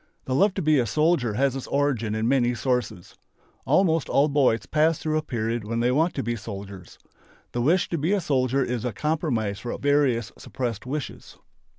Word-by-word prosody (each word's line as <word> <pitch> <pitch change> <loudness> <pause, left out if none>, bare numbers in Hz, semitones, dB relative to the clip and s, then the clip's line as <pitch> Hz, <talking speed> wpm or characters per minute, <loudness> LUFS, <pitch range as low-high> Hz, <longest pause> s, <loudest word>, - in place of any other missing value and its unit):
The 130 - -2
love 190 +8 +3
to 190 - -2
be 155 -2 +4
a 120 - 0
soldier 150 -8 +1
has 135 +2 +1
its 135 - -6
origin 130 -7 0
in 110 +1 0
many 125 -2 +2
sources. 120 -6 -3 0.5
Almost 160 +2 +2
all 145 +2 +3
boys 135 -5 +2
pass 155 +1 +2
through 155 -1 -2
a 155 - +1
period 115 -5 -3
when 115 +2 -3
they 120 +1 +2
want 160 +6 +1
to 135 - -2
be 120 +1 -2
soldiers. 100 -3 -9 0.5
The 120 - -2
wish 170 +9 +2
to 170 - -2
be 160 +6 0
a 205 - +2
soldier 135 -4 +1
is 120 -2 -3
a 125 -3 -2
compromise 120 - -1
for 120 +3 -5
various 140 -7 +1
suppressed 120 -3 -5
wishes. 145 +1 -6
130 Hz, 195 wpm, -25 LUFS, 115-150 Hz, 0.5 s, be